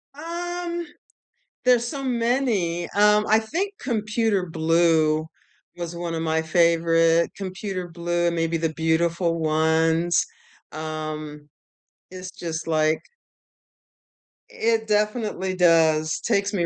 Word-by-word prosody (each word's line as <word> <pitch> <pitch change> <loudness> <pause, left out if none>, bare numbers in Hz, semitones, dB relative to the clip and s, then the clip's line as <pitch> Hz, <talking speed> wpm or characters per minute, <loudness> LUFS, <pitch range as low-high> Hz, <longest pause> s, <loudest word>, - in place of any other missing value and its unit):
Um, 345 +2 -4 0.8
there's 245 -2 +3
so 275 +2 -5
many. 230 -9 0
Um, 210 +1 +4
I 220 +1 +5
think 350 - -3
Computer 215 - 0
Blue 160 -1 +2 0.5
was 170 0 -5
one 170 -1 -4
of 160 - -2
my 160 0 0
favorite. 165 0 +3
Computer 190 -1 -5
Blue, 175 0 -1
maybe 165 0 -1
The 160 -1 -2
Beautiful 165 +1 0
Ones, 160 +2 +2 0.5
um, 155 -1 -6 0.6
it's 185 0 -8
just, 165 -1 -5
like 155 -1 +1 1.5
It 225 0 0
definitely 210 -3 -1
does, 160 -3 +3
takes 200 +1 0
me 175 -4 0
170 Hz, 105 wpm, -23 LUFS, 160-215 Hz, 1.5 s, I